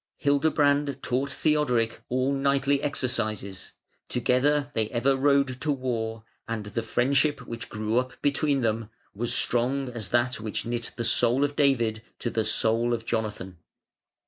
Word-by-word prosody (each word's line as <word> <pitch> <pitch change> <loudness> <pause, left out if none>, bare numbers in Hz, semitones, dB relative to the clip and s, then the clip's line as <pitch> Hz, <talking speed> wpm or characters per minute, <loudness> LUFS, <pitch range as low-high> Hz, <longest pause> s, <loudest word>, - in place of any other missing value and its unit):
Hildebrand 145 -1 +2
taught 130 +3 0
Theodoric 125 -7 +1
all 130 +2 +1
knightly 140 0 +1
exercises; 110 -8 -3 0.4
together 140 +4 +1
they 110 -1 0
ever 130 +3 +2
rode 140 -1 +2
to 150 - +1
war, 115 -4 -2 0.2
and 115 -2 -3
the 105 +3 -3
friendship 135 +6 +1
which 115 -1 -7
grew 110 +2 0
up 125 -1 -5
between 145 -1 +1
them 110 -1 -1 0.2
was 115 +4 -2
strong 130 +3 +1
as 115 -6 -5
that 120 0 +1
which 110 -1 -4
knit 120 0 -3
the 115 - -3
soul 120 +3 +3
of 145 0 -1
David 115 -7 +2 0.2
to 120 - -3
the 110 -1 0
soul 115 +2 +1
of 115 -1 -8
Jonathan. 105 -6 -3
125 Hz, 145 wpm, -26 LUFS, 115-140 Hz, 0.4 s, soul